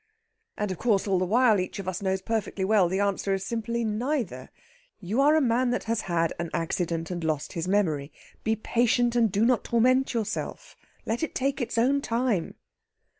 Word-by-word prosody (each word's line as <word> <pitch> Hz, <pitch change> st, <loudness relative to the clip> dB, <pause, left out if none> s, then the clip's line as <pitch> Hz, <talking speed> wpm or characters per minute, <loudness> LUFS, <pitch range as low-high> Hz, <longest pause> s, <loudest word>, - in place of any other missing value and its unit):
"And 210 Hz, -2 st, -2 dB
of 185 Hz, -, -5 dB
course 215 Hz, -4 st, +1 dB
all 190 Hz, -2 st, +2 dB
the 185 Hz, -, +1 dB
while 225 Hz, 0 st, +4 dB
each 185 Hz, -, -4 dB
of 195 Hz, -2 st, -6 dB
us 185 Hz, 0 st, -3 dB
knows 190 Hz, -1 st, -1 dB
perfectly 210 Hz, -3 st, -2 dB
well 195 Hz, -3 st, +3 dB
the 190 Hz, +2 st, -1 dB
answer 200 Hz, -1 st, 0 dB
is 195 Hz, 0 st, -5 dB
simply 235 Hz, +1 st, -2 dB
'Neither.' 220 Hz, -, -2 dB, 0.5 s
You 210 Hz, +7 st, 0 dB
are 295 Hz, +2 st, +5 dB
a 315 Hz, -, +4 dB
man 250 Hz, 0 st, +2 dB
that 245 Hz, -, -1 dB
has 230 Hz, -1 st, -1 dB
had 165 Hz, -1 st, +1 dB
an 170 Hz, -1 st, -3 dB
accident, 165 Hz, 0 st, -2 dB
and 175 Hz, -2 st, -4 dB
lost 155 Hz, -2 st, -2 dB
his 165 Hz, +1 st, -3 dB
memory. 160 Hz, -8 st, 0 dB, 0.3 s
Be 220 Hz, 0 st, +1 dB
patient, 240 Hz, +2 st, +1 dB
and 230 Hz, -4 st, +3 dB
do 205 Hz, +3 st, +2 dB
not 245 Hz, -1 st, +2 dB
torment 255 Hz, +2 st, +2 dB
yourself. 220 Hz, -2 st, -4 dB, 0.3 s
Let 225 Hz, +2 st, -2 dB
it 320 Hz, -, -3 dB
take 275 Hz, +1 st, -1 dB
its 235 Hz, -, -3 dB
own 270 Hz, +5 st, +3 dB
time." 230 Hz, -8 st, -1 dB
215 Hz, 195 wpm, -27 LUFS, 185-240 Hz, 0.5 s, are